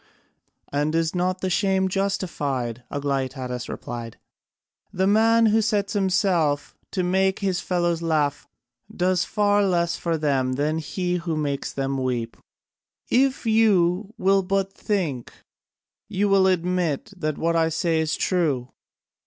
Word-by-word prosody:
"And 150 +2 0
is 165 -1 +1
not 185 +1 -1
the 185 - -1
shame 190 0 +2
justified?" 145 - -2
Aglaïtadas 130 -3 -3
replied. 115 -1 -6 0.7
"The 190 +1 0
man 225 +3 +4
who 220 +1 +4
sets 205 -2 0
himself 185 -7 +1
to 185 - -1
make 190 +1 +2
his 190 -3 -1
fellows 175 -2 0
laugh 155 -4 0 0.4
does 180 0 +1
far 205 -1 +2
less 170 -3 +1
for 165 -1 -1
them 135 -4 0
than 150 +4 0
he 180 +3 -2
who 170 -2 -3
makes 140 -2 -2
them 135 0 -2
weep. 120 -3 -2 0.8
If 265 0 +2
you 210 -2 +2
will 195 +1 +3
but 195 +1 -1
think, 170 - -2 0.8
you 205 0 +1
will 195 -1 +5
admit 180 -2 0
that 155 -5 -3
what 165 0 0
I 165 -1 +3
say 165 0 0
is 160 0 0
true. 145 -9 0
175 Hz, 135 wpm, -24 LUFS, 145-195 Hz, 0.8 s, will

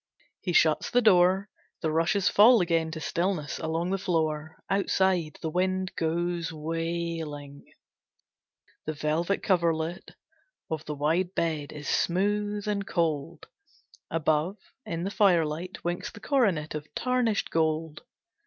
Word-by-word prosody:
He 180 - -2
shuts 160 -2 +3
the 245 0 +3
door. 190 -1 +5 0.3
The 160 -2 0
rushes 170 +5 +2
fall 230 +3 +7
again 165 -3 +1
to 160 0 -6
stillness 170 -1 -2
along 165 +3 -2
the 195 - 0
floor. 160 -3 -1
Outside, 190 -4 +1
the 160 - -1
wind 185 +1 0
goes 170 +1 -1
wailing. 160 -2 -4 1.1
The 155 - -2
velvet 160 +6 0
coverlet 170 -2 0 0.6
of 155 -1 -2
the 150 - -4
wide 165 +6 0
bed 155 -3 -1
is 150 -1 -8
smooth 205 +3 0
and 200 -1 -1
cold. 165 -1 -1 0.6
Above, 160 +4 0 0.3
in 170 0 -3
the 195 - -2
firelight, 175 -3 +1
winks 175 +1 -2
the - - -12
coronet 205 - +1
of 150 0 -6
tarnished 250 -4 0
gold. 160 -1 0
170 Hz, 125 wpm, -27 LUFS, 155-190 Hz, 1.1 s, fall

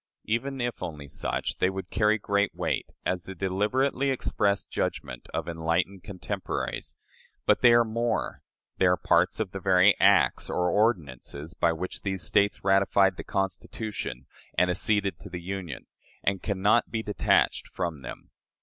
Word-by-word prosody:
Even 135 +5 -1
if 120 -1 -2
only 75 -3 -6
such, - - -3
they 90 - +2
would 95 -1 -6
carry 105 0 +3
great 100 -2 0
weight - - -1 0.2
as 90 -1 -1
the 95 - -7
deliberately 105 +9 0
expressed 100 -6 0
judgment 60 -1 -3
of - - -3
enlightened 85 +3 -1
contemporaries, 95 -3 -4 0.5
but - - +3
they 120 - +7
are 120 0 +6
more: 115 +1 -1 0.4
they 95 - +5
are 90 0 +4
parts 90 +4 +2
of 105 -4 -2
the 95 - -5
very 95 +1 +5
acts - - +4
or 90 0 +1
ordinances 80 - -1
by 85 - +2
which 85 +3 -5
these 95 -3 -3
States 100 +5 +2
ratified 95 0 +4
the - - -7
Constitution 95 - -4 0.3
and 90 0 +4
acceded 100 -1 0
to 100 - -10
the 90 -1 -5
Union, 90 -5 -6 0.4
and 95 -1 0
can 100 -3 -3
not 110 +3 +4
be 115 -1 -2
detached 105 - +2
from 85 -6 -4
them. - - -9
95 Hz, 160 wpm, -27 LUFS, 90-105 Hz, 0.5 s, they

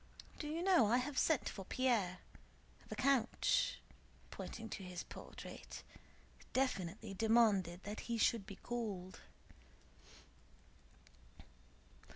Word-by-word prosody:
Do 300 - -3
you 325 +3 -2
know 360 - +6
I 235 +4 +4
have 260 +2 0
sent 320 -5 +3
for 195 - -5
Pierre? 215 -6 +1 0.7
The - - -4
count," 265 -3 +3 0.5
pointing 225 - -6
to 200 - -5
his 180 -1 -5
portrait, - - -9 0.7
"definitely 210 -6 0
demanded 200 -5 +3
that 210 +1 -5
he 235 - +1
should 220 -2 +2
be 200 - -7
called." 200 -6 -4
225 Hz, 105 wpm, -38 LUFS, 195-255 Hz, 0.7 s, know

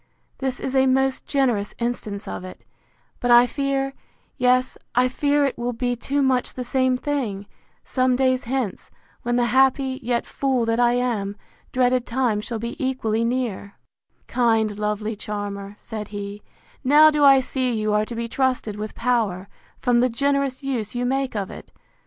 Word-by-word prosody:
This 265 -2 -2
is 265 - -3
a 265 0 +4
most 265 0 +1
generous 245 -8 0
instance 220 -4 -3
of - - -5
it; 185 - -11 0.5
but 245 - -1
I 240 0 +8
fear—yes, 270 -2 -1 0.2
I 250 +1 +4
fear 285 +2 +1
it 270 - -2
will 245 +1 -1
be 245 +1 -1
too 275 +4 -1
much 255 -2 +1
the 255 - -3
same 260 0 +1
thing, 250 -9 -2 0.4
some 255 -1 +1
days 255 -1 +1
hence, 245 -5 -3 0.3
when 240 0 -1
the 245 0 +3
happy, 265 0 +3
yet, 240 0 -1
fool 260 -4 0
that 230 +1 0
I 240 0 +4
am! 220 -5 -1 0.3
dreaded 250 -1 +2
time, 235 -4 0
shall 230 +1 -4
be 235 +4 -5
equally 230 -4 0
near! 230 -5 -2 0.5
Kind, 225 -4 +1
lovely 210 +1 -2
charmer! 205 -1 -5
said 215 -2 -7
he, 205 0 -6 0.4
now 300 +4 +7
do 295 -1 +1
I 275 -1 +8
see 260 -1 -1
you 215 -2 0
are 210 0 +2
to 235 - -7
be 230 0 -3
trusted 250 -4 -1
with 215 0 -6
power, 220 -6 0 0.3
from 245 -1 +2
the 250 +1 +3
generous 275 +2 0
use 245 -5 -3
you 245 0 -1
make 265 -1 -1
of 200 -2 -3
it! - - -11
245 Hz, 170 wpm, -23 LUFS, 215-265 Hz, 0.5 s, I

